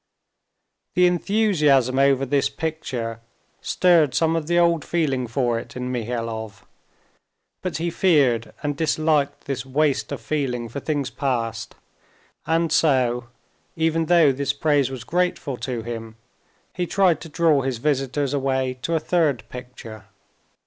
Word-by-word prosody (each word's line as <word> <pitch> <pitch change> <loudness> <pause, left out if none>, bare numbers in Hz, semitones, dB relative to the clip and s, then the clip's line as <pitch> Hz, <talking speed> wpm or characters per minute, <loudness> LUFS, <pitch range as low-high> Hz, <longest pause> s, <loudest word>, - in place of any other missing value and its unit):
The 180 - +5
enthusiasm 170 - +2
over 135 -1 +3
this 140 +1 +1
picture 125 -8 -4 0.4
stirred 165 -7 +3
some 165 0 +2
of 160 -2 -2
the 175 +1 +1
old 170 -3 +3
feeling 135 -7 -1
for 120 -1 0
it - - -11
in 125 0 -4
Mihailov, 115 -4 -4 1.0
but 185 -2 -3
he 170 +1 -2
feared 140 -10 +2
and 145 -1 -1
disliked 155 -1 0
this 135 -2 -3
waste 135 -5 0
of - - -4
feeling 125 -6 -2
for 130 - -5
things 145 -2 -2
past, 115 -5 -3 0.7
and 165 0 +1
so, 125 -6 +2 0.5
even 165 0 0
though 170 -4 +5
this 140 +1 -1
praise 145 -4 +1
was 130 -3 -7
grateful 175 -3 -1
to 120 -3 -4
him, 115 -1 -6 0.6
he 180 -1 -2
tried 185 -5 +2
to 165 - -9
draw 155 -2 +3
his 130 -2 -2
visitors 135 +1 -1
away 130 -2 -1
to 165 - -1
a - - +2
third 155 -7 +1
picture. 125 -4 -10
140 Hz, 140 wpm, -23 LUFS, 125-160 Hz, 1.0 s, The